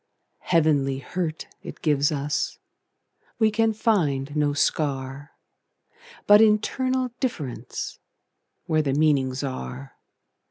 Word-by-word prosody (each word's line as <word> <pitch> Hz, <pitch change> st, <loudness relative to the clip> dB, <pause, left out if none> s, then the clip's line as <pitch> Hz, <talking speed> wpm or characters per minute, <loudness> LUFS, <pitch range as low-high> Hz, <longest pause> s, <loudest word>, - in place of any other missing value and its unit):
Heavenly 150 Hz, -5 st, +2 dB
hurt 160 Hz, +4 st, -4 dB, 0.2 s
it -, -, -10 dB
gives 145 Hz, -2 st, +2 dB
us; 145 Hz, 0 st, -2 dB, 0.8 s
We 220 Hz, -1 st, +3 dB
can 225 Hz, +1 st, +2 dB
find 155 Hz, -, 0 dB
no 145 Hz, -1 st, +2 dB
scar, 140 Hz, -1 st, -1 dB, 0.9 s
But 205 Hz, +1 st, +8 dB
internal 255 Hz, +4 st, +2 dB
differenceWhere 155 Hz, -, -5 dB
the 135 Hz, -2 st, 0 dB
meanings 135 Hz, -4 st, +2 dB
are. 135 Hz, 0 st, -6 dB
150 Hz, 90 wpm, -25 LUFS, 135-205 Hz, 0.9 s, But